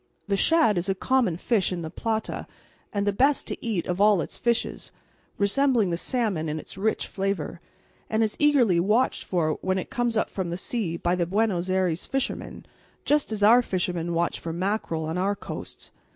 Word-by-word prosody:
The 200 - +1
shad 265 - +3
is 180 +3 -2
a 195 - +1
common 235 -5 +1
fish 200 -1 +1
in 175 -2 -3
the 160 - -6
Plata 220 -1 -3 0.4
and 200 -1 -1
the 205 - +1
best 275 +7 +2
to - - -6
eat 210 -8 -1
of 180 +2 -2
all 205 -2 +5
its - - -4
fishes, 235 -1 -1 0.5
resembling 220 -1 +2
the - - +1
salmon 190 -5 -1
in 150 - -2
its 155 - -8
rich 210 +3 0
flavour, 190 -4 -3 0.5
and 220 +1 +2
is 215 - -1
eagerly 260 - +4
watched 215 +8 +2
for 160 -4 0
when 190 0 0
it 185 - -5
comes 240 -2 0
up - - 0
from 185 -3 -3
the 170 - -3
sea 185 -4 -3
by 175 +1 0
the 175 -2 0
Buenos 190 -2 0
Ayres 185 -3 0
fishermen, 270 0 -3 0.4
just 295 -4 +2
as 210 -2 -2
our 235 +4 +7
fishermen 175 -5 -2
watch 170 +1 0
for 165 - -5
mackerel 175 -2 -2
on 160 +3 -2
our 200 +2 +1
coasts. - - -8
195 Hz, 195 wpm, -26 LUFS, 175-225 Hz, 0.5 s, our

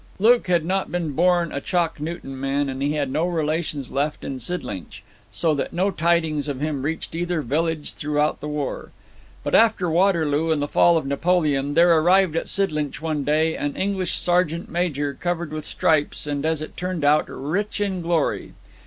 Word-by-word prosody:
Luke 230 +2 +4
had 175 -3 +2
not 190 +2 -1
been 175 -3 -2
born 175 +2 +2
a 140 - -3
Chalk 170 -2 0
Newton 150 -4 -6
man, 140 +1 0
and 135 0 -5
he 145 +2 +1
had 145 -3 -1
no 155 +5 +1
relations 155 -4 -2
left 145 +2 -1
in 135 -1 -4
Sidlinch, 120 - -6 0.3
so 165 -2 +1
that 140 - -3
no 190 +3 +1
tidings 160 -4 +1
of 140 -3 -3
him 150 -2 -2
reached 160 +4 -4
either 175 -1 -1
village 155 +4 -1
throughout 150 0 0
the 150 - -6
war. 150 -2 -4 0.5
But - - -3
after 220 -7 +4
Waterloo 165 -4 +2
and 160 -2 +2
the 145 - -1
fall 170 +3 +4
of 155 - -2
Napoleon 145 -1 +1
there 170 0 +6
arrived 180 0 +4
at 165 - -2
Sidlinch 150 -9 -1
one 155 -2 -2
day 155 +3 +2
an 145 -1 -3
English 190 -2 -1
sergeant 175 -1 0
major 145 -5 -1
covered 170 0 -3
with 155 -1 -4
stripes 155 -2 +1
and, 145 +1 -2
as 160 -1 -1
it - - -9
turned 180 -3 -3
out, 150 +1 +4
rich 185 +11 -3
in 195 -3 -1
glory. 165 -2 -1
160 Hz, 185 wpm, -23 LUFS, 145-175 Hz, 0.5 s, there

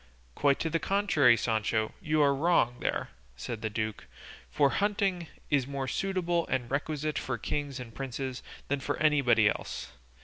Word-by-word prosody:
"Quite 140 - +3
the 165 0 0
contrary, 160 - +4
Sancho; 110 -1 0
you 155 -1 +2
are 140 -1 +4
wrong 135 -5 +2
there," - - -1 0.3
said 110 - -5
the 110 - -1
duke; 110 0 -4 0.4
"for 140 -2 +3
hunting 195 -4 0 0.2
is 140 -3 +2
more 140 -1 -3
suitable 175 -1 0
and 125 -2 -2
requisite 150 0 -1
for 130 -1 -3
kings 140 +3 -3
and 115 -3 -8
princes 130 +1 -4 0.3
than 140 0 0
for - - -2
anybody 135 -8 +4
else. - - -3
140 Hz, 150 wpm, -29 LUFS, 120-155 Hz, 0.4 s, contrary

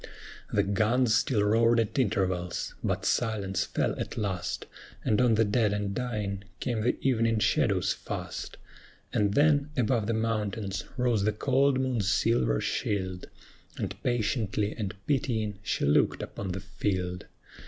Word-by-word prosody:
The - - +3
guns 110 +4 +2
still 110 0 +2
roared 115 +3 +4
at 115 +4 0
intervals; 95 -6 0
but - - -1
silence 100 -5 0
fell - - 0
at - - -4
last, 95 -5 -2 0.4
And 110 +3 +3
on 120 -3 +4
the 110 +1 +3
dead 105 0 +2
and 105 -1 -2
dying 105 -5 -3 0.2
came 120 -4 -1
the 120 +3 +1
evening 115 -3 +2
shadows 105 - +2
fast. - - -6 0.6
And 100 -1 +1
then 145 -1 +4
above 120 -3 +1
the 115 - +1
mountains 110 -2 -2
rose 120 -5 +2
the 110 - +3
cold 135 +4 +2
moon's 125 -6 0
silver 105 - +2
shield, 95 -3 -2 0.5
And - - -3
patiently 110 -3 0
and 105 -3 -4
pitying 110 -7 0
she - - -1
looked 70 - +3
upon 95 -2 -5
the 95 - -4
field. 95 -2 -3
110 Hz, 145 wpm, -28 LUFS, 100-120 Hz, 0.6 s, roared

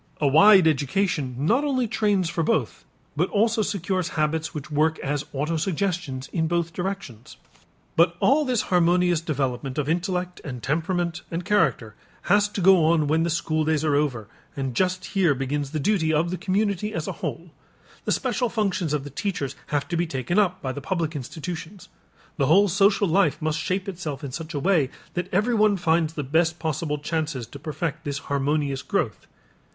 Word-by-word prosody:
A 150 - 0
wide 190 +5 +7
education 150 -1 0
not 215 - +2
only 260 -4 0
trains 210 -4 +1
for 170 0 -2
both 145 -6 -1 0.3
but 170 +5 +1
also 220 +2 +2
secures 185 -3 -1
habits 155 +1 0
which 150 0 -7
work 155 +2 +2
as 145 +1 -2
autosuggestions 160 -1 -2
in 160 -2 +1
both 170 0 -1
directions. 180 - -5 0.6
But 170 +1 +4
all 285 +4 +4
this 255 -5 0
harmonious 175 -1 +3
development 135 -4 -2
of 145 -2 -1
intellect 180 +2 -2
and 125 -5 -7
temperament 170 +3 -1
and 170 +1 -4
character 155 - +1 0.3
has 205 +2 +3
to 205 - -4
go 185 -2 +6
on 160 -1 +3
when 155 +3 +2
the 170 - +1
school 155 -1 0
days 155 0 +1
are 150 - +2
over 130 -8 0 0.3
and 135 -2 -2
just 185 +2 0
here 180 -7 +2
begins 135 +2 -2
the 155 +2 -3
duty 160 0 +1
of 160 +3 +1
the - - -1
community 205 +1 -1
as - - -3
a - - -1
whole. - - -5 0.5
The - - 0
special 250 -2 0
functions 195 -8 -1
of 150 -2 -1
the 145 - -8
teachers 140 -4 -3
have 145 -1 -1
to 175 - -1
be 170 +1 0
taken 140 - 0
up 185 -2 +1
by 130 - -1
the 145 - -6
public 165 -1 -2
institutions. 170 +6 -7 0.5
The 140 -4 +2
whole 195 +6 +5
social 200 +2 +3
life 165 -3 +2
must 155 0 -1
shape 185 +4 -2
itself 165 -8 -5
in 140 - -5
such 160 +3 -6
a - - 0
way 165 -5 +2 0.2
that 180 +1 -3
everyone 210 0 +3
finds 165 -2 +1
the 150 - -3
best 160 +4 +1
possible 155 -2 -2
chances 150 -4 -3
to 140 +5 -11
perfect 155 +1 -4
this 145 -2 -3
harmonious 140 0 -1
growth. - - -2
165 Hz, 180 wpm, -24 LUFS, 145-185 Hz, 0.6 s, wide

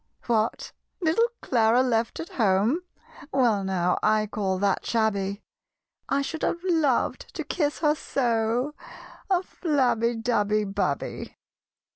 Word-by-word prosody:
"What! 225 -2 0 0.3
little 355 +7 +3 0.2
Clara 235 0 +3
left 230 -2 0
at 330 - -6
home? 215 - +2 0.5
Well 235 -7 +2
now 180 -2 0
I 215 0 +3
call 200 -3 -2
that 200 0 +1
shabby: 200 -3 0 0.7
I 280 0 +1
should 320 +3 -5
have 340 - -1
loved 320 -8 +1
to - - -3
kiss 295 -4 -1
her 300 -2 +4
so 240 -1 0 0.6
(A 370 -1 +2
flabby, 255 -10 +1
dabby, 215 -2 +1
babby!) 195 -8 -3
230 Hz, 120 wpm, -26 LUFS, 205-280 Hz, 0.7 s, her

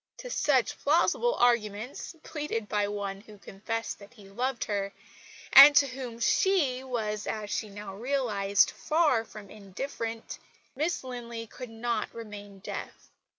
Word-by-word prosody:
To - - -8
such 260 - +2
plausible 345 +11 +2
arguments, 235 - 0
pleaded 295 -9 -4
by 205 -1 0
one 200 -1 -4
who 210 0 -14
confessed 215 +3 -5
that 200 +4 -15
he 205 -4 -15
loved 240 +4 -2
her, 200 -1 -2 0.6
and 280 +2 +11
to 285 - +7
whom 255 -3 -7
she 275 - +2
was 215 -5 -3
(as 210 -2 -4
she 215 - -2
now 200 -1 -8
realised) 205 -4 +2
far 300 -8 +2
from 210 -3 -12
indifferent, 225 +3 -6 0.4
Miss 310 +4 -1
Linley 235 -2 -6
could 250 +2 -9
not 225 0 -2
remain 205 -3 -9
deaf. - - -7
230 Hz, 140 wpm, -29 LUFS, 205-260 Hz, 0.6 s, and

